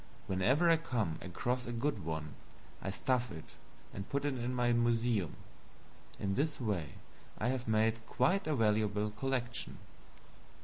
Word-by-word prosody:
Whenever 120 - +3
I 165 -1 +7
come 115 - -1
across 125 +8 -2
a - - -2
good 130 - -1
one, 80 -1 -3 0.5
I - - -3
stuff 125 +4 +1
it 80 -4 -9 0.4
and 100 0 -6
put 140 +1 0
it 145 - +1
in 120 0 -2
my 120 -1 +3
museum. 115 -6 +2 0.8
In 95 -1 0
this 145 +6 0
way 100 - -1 0.4
I 120 - 0
have 130 -2 -1
made 110 +1 +2
quite 155 - +2
a 155 - +2
valuable 105 -2 +2
collection. 125 +1 -2
120 Hz, 145 wpm, -34 LUFS, 105-130 Hz, 0.8 s, I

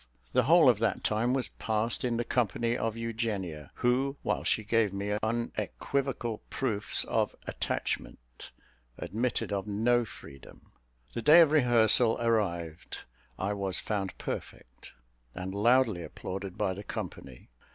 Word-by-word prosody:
The 125 - +3
whole 165 0 +6
of 120 -5 +5
that 110 -3 0
time 110 +3 +1
was 130 -2 -1
passed 110 +1 0
in 120 -2 0
the 120 - 0
company 120 0 0
of 115 -2 -2
Eugenia, 105 - -3
who, 130 +3 +1
while - - -1
she 110 - +1
gave 110 -1 +2
me 100 +1 -2
unequivocal 120 +2 -2
proofs 110 -6 0
of - - 0
attachment, - - -4 0.5
admitted 115 -1 -2
of 100 0 -2
no 120 +4 +2
freedom. 70 - -13 0.4
The 120 - -3
day 150 +8 +8
of 160 -3 +5
rehearsal 120 -5 +4
arrived, 85 -9 -1 0.4
I 100 +2 -1
was 95 -2 -2
found 100 -3 -3
perfect, 60 +1 -7 0.4
and 95 +1 -5
loudly 115 -2 +3
applauded 95 +3 -6
by 100 -3 0
the 100 +2 -8
company. 65 -9 -7
110 Hz, 135 wpm, -30 LUFS, 100-120 Hz, 0.5 s, day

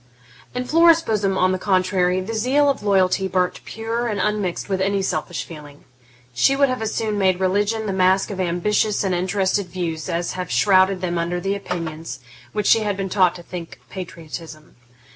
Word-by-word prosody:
In 250 0 -2
Flora's 330 +3 +5
bosom, 200 -6 0
on 185 0 +3
the 185 - -1
contrary, 185 -1 +1
the 210 +5 -5
zeal 270 +6 +3
of 275 - -5
loyalty 190 -2 +2
burnt 180 -1 -1
pure 230 +2 -3
and 210 -3 -2
unmixed 205 -3 -1
with 190 -2 -1
any 195 0 +1
selfish 170 -1 -2
feeling; 150 -3 -12 0.5
she 195 - +3
would 280 0 +3
have 255 -2 -2
as 220 -1 -1
soon 215 -2 -1
made 185 -2 +2
religion 205 +4 0
the 200 - -2
mask 190 +2 +2
of 195 - -6
ambitious 200 +4 +1
and 190 -2 0
interested 190 +2 0
views 170 -2 -4
as 170 0 -1
have 180 -2 -5
shrouded 190 -1 +3
them 175 -2 -1
under 170 +1 -1
the 195 +2 -1
opinions 165 -5 -5 0.3
which 210 -1 -2
she 225 - +5
had 205 -2 -2
been 195 -1 -3
taught 185 -2 +3
to 175 - -10
think 170 -1 -8
patriotism. 165 -3 -9
190 Hz, 185 wpm, -21 LUFS, 180-210 Hz, 0.5 s, Flora's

